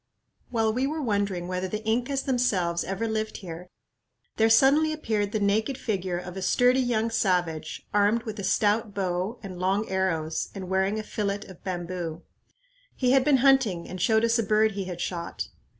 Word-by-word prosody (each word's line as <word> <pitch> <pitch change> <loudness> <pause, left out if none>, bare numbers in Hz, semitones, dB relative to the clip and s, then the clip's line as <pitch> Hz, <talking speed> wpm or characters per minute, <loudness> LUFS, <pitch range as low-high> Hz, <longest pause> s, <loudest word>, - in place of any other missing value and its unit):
While 225 -2 +1
we 255 +3 0
were 310 +2 -3
wondering 200 -8 -1
whether 185 +1 -2
the 215 +3 -5
Incas 245 +5 0
themselves 195 -10 +1
ever 195 +4 -2
lived 220 0 -2
here, 180 -1 -8 0.7
there 225 0 +4
suddenly 275 +7 +5
appeared 215 -9 -1
the 215 - 0
naked 215 +6 +1
figure 190 -7 -2
of 180 0 -7
a 190 - -5
sturdy 250 +7 +3
young 230 -3 0
savage, 175 -7 -1
armed 210 +3 +3
with 220 -2 -6
a - - -4
stout 210 0 +1
bow 190 +3 -1
and 185 -3 -7
long 195 +4 +1
arrows, 165 -4 -1
and 190 -2 -6
wearing 190 +2 +1
a 215 - -3
fillet 205 -1 -2
of 185 -3 -14
bamboo. 175 -3 -4 0.7
He 250 -2 +2
had 265 0 +5
been 285 -1 +4
hunting 240 -11 +3
and 185 -1 -6
showed 220 +3 +3
us 230 0 +2
a - - +2
bird 215 +1 +3
he 195 -1 -4
had 180 -2 -6
shot. 170 -2 -4
205 Hz, 180 wpm, -26 LUFS, 185-230 Hz, 0.7 s, suddenly